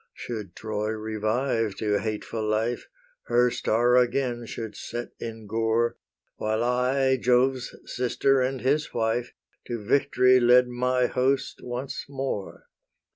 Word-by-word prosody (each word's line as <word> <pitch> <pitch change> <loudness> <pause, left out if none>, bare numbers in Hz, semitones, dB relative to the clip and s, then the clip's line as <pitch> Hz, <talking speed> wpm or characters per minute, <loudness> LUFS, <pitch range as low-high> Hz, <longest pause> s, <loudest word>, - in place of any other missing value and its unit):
Should 105 -6 -6
Troy 105 -1 -3
revive 110 +1 -1
to 105 0 0
hateful 110 +1 -3
life, 110 +3 -1 0.4
Her 120 +1 +3
star 120 +3 +2
again 120 -1 +1
should 110 -1 -6
set 120 0 -5
in 115 -1 -7
gore, 115 +2 +1 0.4
While 110 +1 0
I, 130 +2 +2
Jove's 125 +1 +1
sister 130 +2 +1
and 130 0 -1
his 145 +4 0
wife, 115 +1 0 0.3
To 120 - -2
victory 130 +3 +3
led 125 +1 +6
my 125 +1 +1
host 130 +2 0
once 125 +2 -5
more. 135 -8 -4
120 Hz, 125 wpm, -26 LUFS, 110-125 Hz, 0.4 s, led